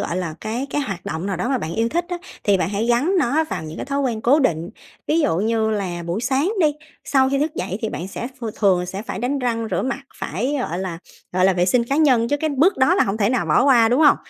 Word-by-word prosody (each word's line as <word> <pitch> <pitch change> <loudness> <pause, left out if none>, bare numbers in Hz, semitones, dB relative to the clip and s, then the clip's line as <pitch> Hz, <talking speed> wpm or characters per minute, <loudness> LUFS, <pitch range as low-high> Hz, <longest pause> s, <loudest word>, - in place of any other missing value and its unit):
là, - - -2
gọi - - -2
là, 170 -4 -3
cái 230 +5 -3
cái 290 - 0
hoạt 195 -10 -5
động 160 +4 -4
nào 195 -3 -2
đó 235 +8 -2
mà 265 - +1
bạn 165 -5 -4
yêu 225 +1 +1
thích 340 +6 -1
á, 355 - -2 0.3
thì 200 -1 +4
bạn 185 - -1
hãy 205 +3 -1
gắn 250 +11 +2
nó 310 +2 +2
vào 315 - -5
những 155 0 -8
cái - - -5
thói 280 0 -1
quen 240 -5 -1
cố 255 +7 +4
định. 170 - 0 0.4
Ví 320 +2 +2
dụ 285 - +1
như 220 +2 +1
là 185 -5 -2
buổi 175 +5 -2
sáng 265 +7 +1
đi, 315 - +5 0.4
sau 265 -1 +3
khi 275 - +1
thức 300 +2 -1
dậy 190 +2 -3
thì 220 - -2
bạn 175 -1 -5
sẽ 235 - -5
ph 240 - -7
thường 185 -4 +2
sẽ 190 +3 -5
phải 220 - -5
đánh 255 +6 -1
răng 230 -3 -1
rửa - - 0
mặt, 270 +2 -2 0.2
phải, 250 - -2
gọi 175 -7 -3
là, 185 -3 -4 0.3
gọi 185 0 +2
là 190 - +5
vệ 180 -1 +1
sinh 235 +5 +3
cá 275 +4 -1
nhân, 255 -7 +4
chứ 290 - +1
cái 315 - 0
bước 300 +8 +3
đó 265 +7 +4
là 385 - +3
hông 195 +1 -2
thể 205 -2 +2
nào 250 - 0
bỏ - - +3
qua, 240 -5 +5
đúng 250 +5 +2
hông? 295 -2 +6
230 Hz, 290 wpm, -21 LUFS, 190-275 Hz, 0.4 s, hông